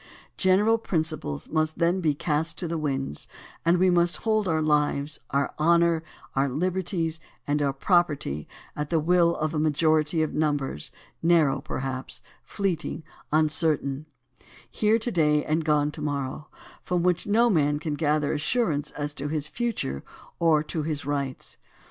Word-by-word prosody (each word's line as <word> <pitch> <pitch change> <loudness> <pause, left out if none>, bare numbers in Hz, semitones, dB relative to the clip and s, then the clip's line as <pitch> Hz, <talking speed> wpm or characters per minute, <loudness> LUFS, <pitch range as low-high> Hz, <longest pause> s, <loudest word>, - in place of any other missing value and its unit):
General 205 +4 +3
principles 155 - -2
must 155 0 0
then 175 +2 +2
be 155 -4 +1
cast 155 +2 -1
to 175 - -4
the 165 0 -2
winds, 135 - -2 0.4
and 170 +2 +4
we 185 +1 +4
must 175 0 +2
hold 215 -2 0
our 160 -2 +1
lives, 150 -1 +1
our 140 -1 0
honor, 170 +1 +4 0.3
our 135 +1 +2
liberties, 170 +1 -1 0.3
and 145 +1 0
our 140 -1 +2
property 140 - +1 0.3
at 150 0 -3
the 165 - +2
will 170 +1 +3
of 155 +1 -2
a 155 - 0
majority 155 +1 +2
of 155 - -3
numbers, 145 - -1 0.3
narrow 165 -5 +3
perhaps, 130 -1 -5 0.2
fleeting, 180 -5 -2 0.3
uncer 155 0 +2
tain; 140 +2 -5 0.6
here 215 +1 +3
to 230 +2 -3
day 150 -4 +2
and 155 +1 0
gone 150 -1 +2
to 150 - -9
morrow, 145 0 -3 0.3
from 180 -1 -1
which 180 +1 +1
no 225 +4 +4
man 150 -8 +2
can 150 0 -3
gather 150 -1 +1
assurance 150 - 0
as 145 0 -4
to 145 0 -4
his 150 -1 -2
future 225 - -3 0.4
or 160 -3 +4
as - - -8
to 155 - -3
his 150 -2 -3
rights. 140 -2 -3
155 Hz, 160 wpm, -26 LUFS, 145-170 Hz, 0.6 s, and